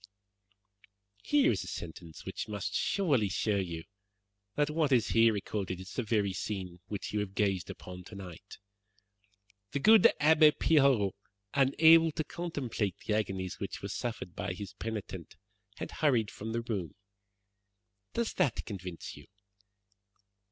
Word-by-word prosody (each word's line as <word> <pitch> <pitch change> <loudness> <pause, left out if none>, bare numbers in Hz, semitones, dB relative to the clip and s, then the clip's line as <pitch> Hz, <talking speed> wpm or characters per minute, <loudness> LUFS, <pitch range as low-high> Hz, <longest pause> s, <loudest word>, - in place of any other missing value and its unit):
"Here 290 +1 +3
is - - -1
a - - -9
sentence 80 -1 -8
which - - -5
must 105 -2 -4
surely 140 - +1
show 105 +2 0
you 85 -4 -3 0.7
that 145 0 +1
what 155 -2 +1
is 120 -4 +3
here 115 0 +5
recorded 100 -3 -3
is 95 +1 -9
the - - -1
very 105 -4 0
scene 95 -3 -4
which 105 -1 -5
you 105 - +1
have 100 -2 -4
gazed 95 -4 0
upon 90 0 -9
tonight: 95 -4 -10 1.2
'The 140 - 0
good 220 +6 +7
Abbe 155 0 +6
Pirot, 135 -13 +3 0.4
unable 160 +4 +6
to 155 - -1
contemplate 135 - -3
the 105 - 0
agonies 95 -3 -2
which - - -5
were - - -4
suffered - - -4
by - - -3
his 100 0 -7
penitent, 100 -6 -6 0.4
had - - -5
hurried 120 -8 +1
from 110 +2 -6
the 115 +1 -1
room.' 100 -9 -4 1.2
Does 235 -1 0
that 125 - 0
convince 90 -5 -7
you?" - - -14
105 Hz, 140 wpm, -31 LUFS, 95-140 Hz, 1.2 s, good